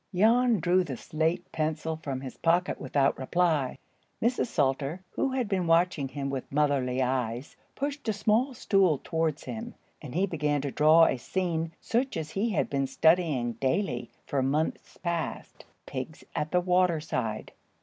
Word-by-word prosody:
] - - -11
Jan 230 +3 +4
drew 180 +2 +3
the 135 -8 -5
slate 165 +6 -1
pencil 160 +1 -1
from 140 -4 -5
his 130 -2 -7
pocket 175 +2 +1
without 135 0 +1
reply. 155 -1 +1 0.4
Mrs. 245 +2 +1
Salter, 145 - 0
who 270 - 0
had 255 -4 0
been 185 -4 0
watching 165 -4 +3
him 140 +1 -4
with 135 -2 -5
motherly 135 -3 +1
eyes, 125 0 -2 0.2
pushed 285 -3 -3
a - - +2
small 220 +6 +1
stool 190 - +3
towards 160 -3 -1
him, 235 +1 -6 0.3
and 150 -3 -8
he 185 +3 +3
began 150 -5 0
to 140 -1 -3
draw 155 +3 +6
a 130 - +1
scene 165 +3 -2
such 245 -2 -1
as 155 -1 -4
he 210 +4 0
had 200 - 0
been 135 -1 -1
studying 155 -7 +2
daily 125 - -1 0.2
for 140 - 0
months 145 +4 -1
past,—pigs 170 -2 -5
at 150 +1 -1
the 180 +2 +2
water 180 -2 +3
side. 115 -8 -3
160 Hz, 160 wpm, -28 LUFS, 135-185 Hz, 0.4 s, draw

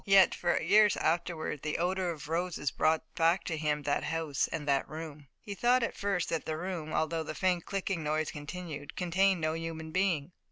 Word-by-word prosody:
Yet, 195 -1 +6
for 175 -1 +1
years 210 0 +5
afterward, 160 -3 -1
the 150 0 -2
odor 180 +1 0
of 155 -4 -6
roses 165 -2 -1
brought 160 0 +2
back 165 +2 +3
to 165 - -2
him 150 -1 -1
that 145 - 0
house 160 -3 0
and 155 -3 -5
that 140 -1 +1
room. 155 -2 -8
He 205 - -7
thought 240 +5 +3
at - - -2
first 200 -4 -1
that 165 - -2
the 155 -1 -2
room, 170 -3 -4
although 160 +1 0
the 155 -1 -5
faint 180 +1 0
clicking 195 -3 -2
noise 155 +1 0
continued, 150 -1 -7
contained 185 +1 +2
no 155 0 +1
human 165 -1 -5
being. 180 -4 +1
165 Hz, 195 wpm, -31 LUFS, 155-180 Hz, -, Yet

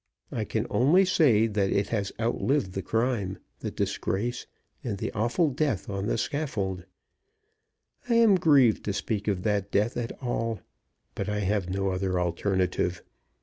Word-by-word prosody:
I - - -2
can - - -1
only 170 +10 +4
say 135 - +4
that 105 -3 0
it 100 +1 0
has 100 -4 -1
outlived 115 -1 0
the 95 - -2
crime, 115 -3 -1 0.2
the - - -3
disgrace, 100 +4 -2 0.4
and 110 -5 -3
the - - -3
awful 120 +9 +1
death 130 -8 -1
on 100 +1 -2
the - - 0
scaffold. 100 - -2 1.2
I 235 - +3
am 230 -3 +6
grieved 145 - +4
to 100 - -1
speak 105 0 -2
of 95 -3 0
that 100 -2 0
death 105 +4 +1
at 120 -1 -2
all; 115 -5 -2 0.5
but 100 - -3
I 105 0 -1
have 100 -2 0
no 95 +1 0
other 95 -1 -1
alternative. 90 0 0
105 Hz, 155 wpm, -27 LUFS, 95-120 Hz, 1.2 s, am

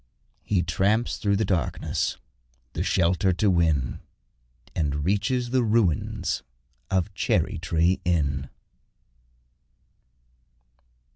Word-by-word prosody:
He 95 -4 0
tramps 100 +7 +1
through 100 -2 +1
the 110 +2 +1
darkness 90 -4 -1 0.6
the - - -3
shelter 90 +2 +2
to 100 +2 +2
win, 80 -8 +1 0.8
And 75 -2 -1
reaches 115 +6 0
the 130 -1 +3
ruins 110 - +1 0.5
of 95 -3 0
Cherry - - 0
tree 85 +3 +1
Inn. 70 -6 0
90 Hz, 90 wpm, -25 LUFS, 80-105 Hz, 0.8 s, the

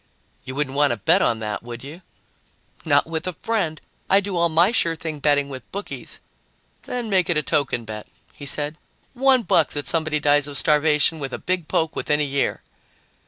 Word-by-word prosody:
"You 130 - -6
wouldn't 140 -2 -2
want 145 0 +4
to 120 - -1
bet 100 - +3
on 115 - +2
that, 105 -1 -3
would 120 +1 -8
you?" 155 +6 -9 0.8
"Not - - +3
with 160 +1 -4
a 180 - -3
friend. 195 -9 -1 0.3
I 195 - +6
do 200 -1 -4
all 170 0 +2
my 170 +6 +4
sure 165 -8 +1
thing 160 -2 -5
betting 145 -1 +2
with 130 -3 -9
bookies." 200 +1 -6 0.6
"Then 245 -2 -4
make 190 -4 +2
it 170 - +2
a 150 - +2
token 140 -7 0
bet," 105 -1 -7 0.3
he 145 - -8
said. 150 +3 -2 0.3
"One 265 -1 +3
buck 165 -4 +3
that 145 -1 -3
somebody 155 -2 0
dies 145 -1 +3
of 145 -1 +1
starvation 150 +2 +3
with 135 -2 -5
a - - -2
big 185 -3 -2
poke 160 0 0
within 150 0 +1
a - - +2
year." 140 0 -1
150 Hz, 200 wpm, -23 LUFS, 140-170 Hz, 0.8 s, I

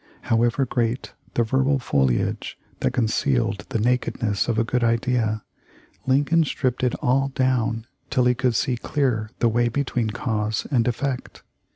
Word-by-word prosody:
However 120 +4 +2
great 120 +1 -2 0.2
the 120 - +3
verbal 135 +4 +2
foliage 65 - 0 0.2
that - - +1
concealed 115 -3 0
the - - -1
nakedness 115 -2 0
of 115 -2 0
a 115 - +3
good 125 +1 0
idea 115 -2 +1 0.6
Lincoln 145 +5 +3
stripped 130 -4 -1
it 125 - +2
all 135 +2 +3
down 120 -4 +1 0.2
till 125 -2 +2
he 125 - +4
could 125 -1 0
see 125 +2 +1
clear 120 -5 -1
the 120 - +2
way 120 +1 +2
between 120 -2 -1
cause 105 -1 -2
and 120 -4 +2
effect. 125 +2 -3
120 Hz, 150 wpm, -23 LUFS, 115-130 Hz, 0.6 s, he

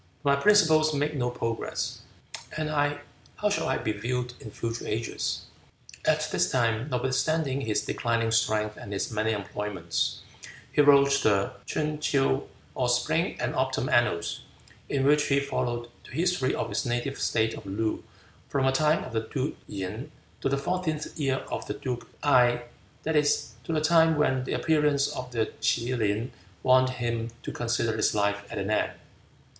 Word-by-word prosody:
But 140 -1 +4
my - - -4
principles 155 -7 +5
make 145 +2 0
no 125 -3 0
progress, 115 -2 -3 0.6
and 155 0 -1
I, 145 -1 +1 0.3
how 210 0 0
shall - - 0
I 130 - +1
be 110 - -1
viewed 125 +4 -2
in 110 - -9
future 115 +2 -4
ages?" 115 +1 -2 0.6
At - - +2
this - - +2
time, 115 +1 +1
notwithstanding 135 +3 0
his 110 -5 -1
declining 115 -1 0
strength 110 -1 +1
and 100 - -7
his 100 - -2
many 110 0 0
employments, 100 -4 -2 0.5
he - - +4
wrote 140 -1 +6
the 100 -2 +2 0.2
Ch'un 150 0 -1
ts'ew, 135 - +1 0.3
or 125 -1 0
Spring 155 +8 +1
and - - -1
Autumn 130 0 0
Annals, 120 -8 +1 0.5
in 135 -1 +1
which 150 +1 +4
he 140 0 +3
followed 120 -4 -2 0.2
the - - -14
history 165 -2 +1
of - - -2
his - - -1
native 120 +2 -2
state 110 0 +1
of 105 - -9
Loo, 110 +3 -1 0.5
from 135 -2 +1
the 135 - +4
time 150 +3 +2
of 125 - -8
the 110 - +2
duke 135 0 -1
Yin 105 +9 -5 0.3
to - - +1
the 140 - +1
fourteenth 155 +1 -2
year 135 -2 0
of - - -3
the - - -3
duke 125 -3 -4 0.2
Gae, 125 -4 +4 0.4
that 160 0 -1
is, 150 -5 +2
to - - -3
the 155 -1 +1
time 160 0 +5
when 130 -4 +1
the - - -2
appearance 150 -3 +2
of 125 0 -5
the 115 -2 -1
K'e 120 +2 +1
lin 110 +1 0 0.3
warned 130 0 +5
him 120 -2 -2
to - - -4
consider 115 -1 0
his 110 - +1
life 100 0 +1
at - - -5
an 100 +1 -2
end. - - +1
130 Hz, 170 wpm, -27 LUFS, 115-145 Hz, 0.6 s, wrote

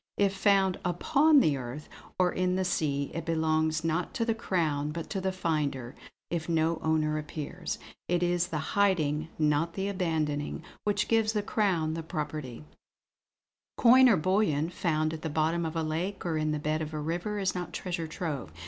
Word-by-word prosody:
If 200 -1 +3
found 195 -2 +3
upon 285 - +4
the 150 - +2
earth, 130 +4 -7 0.3
or 180 -1 +3
in 185 0 +1
the 190 0 0
sea, 140 -5 0
it 165 - -3
belongs, 160 -1 +1
not 165 +2 -1
to 230 - 0
the 225 - +2
Crown, 160 -9 -1
but 165 +1 -6
to 195 - -2
the 190 0 0
finder, 150 -8 -2 0.4
if 170 -1 -2
no 165 0 +1
owner 155 -1 +1
appears. 155 +3 -5 0.3
It 175 0 +1
is 175 0 +1
the 165 - -3 0.2
hiding, 160 -6 +2
not 155 +2 +1
the 195 0 -1
abandoning, 160 -6 -1 0.2
which 205 -1 +1
gives 225 -1 +2
the 210 -2 0
Crown 185 -8 +1
the 165 - -3
property." 150 -5 -5 1.1
"Coin 255 +2 +7
or 215 - +5
bullion 170 -3 +1
found 155 -3 0
at 160 - -6
the 160 - -3
bottom 160 +2 +1
of 160 - -6
a 165 - 0
lake 175 +6 -3
or 165 -2 0
in 155 0 0
the 150 - 0
bed 155 +1 -1
of 155 0 -4
a - - -2
river 175 +7 -2
is 195 -2 0
not 180 -1 -4
treasure 170 -3 -3
trove. 155 - -4
165 Hz, 185 wpm, -29 LUFS, 155-185 Hz, 1.1 s, Coin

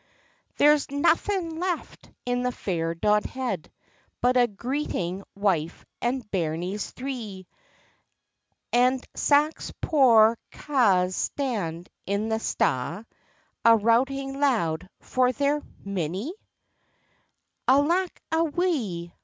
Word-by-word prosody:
"There's 295 0 +4
naething 330 +3 +1
left 360 -2 -4 0.2
in 245 0 0
the 250 0 0
fair 165 -7 -2
Dodhead, 210 +1 -1 0.5
But 250 +1 +2
a 245 -1 +5
greeting 200 -5 -3
wife 185 -6 -1 0.2
and 250 +2 -1
bairnies 175 +3 -2
three, 230 -8 -6 1.3
And 250 +2 +3
sax 295 +2 +2
poor 230 -7 +5
câ's 195 -11 +2
stand 190 - -2 0.2
in 200 +3 -1
the 220 0 0
sta', 165 - -1 0.6
A' 230 0 +7
routing 270 +5 +1
loud 190 - +1
for 255 -1 +1
their 285 +3 0 0.2
minnie." 195 - -3 1.3
"Alack 335 +8 +2
a 320 +1 +3
wae!" 275 - -1
240 Hz, 95 wpm, -26 LUFS, 190-280 Hz, 1.3 s, A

